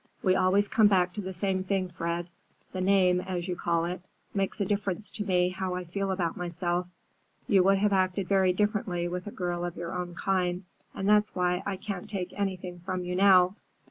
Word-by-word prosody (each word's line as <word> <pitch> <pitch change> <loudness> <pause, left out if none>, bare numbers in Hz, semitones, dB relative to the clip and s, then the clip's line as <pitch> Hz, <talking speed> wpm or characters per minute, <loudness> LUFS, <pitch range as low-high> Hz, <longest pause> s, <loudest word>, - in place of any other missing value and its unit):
"We 185 -1 +4
always 195 +2 +3
come 215 0 +5
back 180 -3 +2
to 210 - -4
the 190 -1 -5
same 190 0 -1
thing, 190 -1 -1
Fred. 170 0 -3 0.4
The 185 - -3
name, 185 -1 +4
as 180 -1 -4
you 180 - -2
call 170 -1 0
it, 180 +2 -4 0.3
makes 195 +2 -1
a 200 - +1
difference 200 0 -1
to 210 - -4
me 180 -2 +2
how 185 0 -3
I 180 - -3
feel 195 +3 -3
about 180 -3 -1
myself. 175 0 -2 0.6
You 200 -6 +5
would 195 0 +5
have 205 +1 +2
acted 185 0 +1
very 190 -2 +3
differently 195 -3 0
with 180 +2 -5
a - - -5
girl 175 -2 -3
of 175 -1 -4
your 170 +1 -5
own 180 -1 -4
kind, 180 -1 0 0.3
and 195 - -2
that's 210 0 +3
why 180 0 +1
I 200 - -1
can't 195 -3 -6
take 185 -3 -4
anything 185 -3 -3
from 185 +1 -3
you 180 0 -3
now. 185 0 +5
185 Hz, 205 wpm, -28 LUFS, 180-195 Hz, 0.6 s, come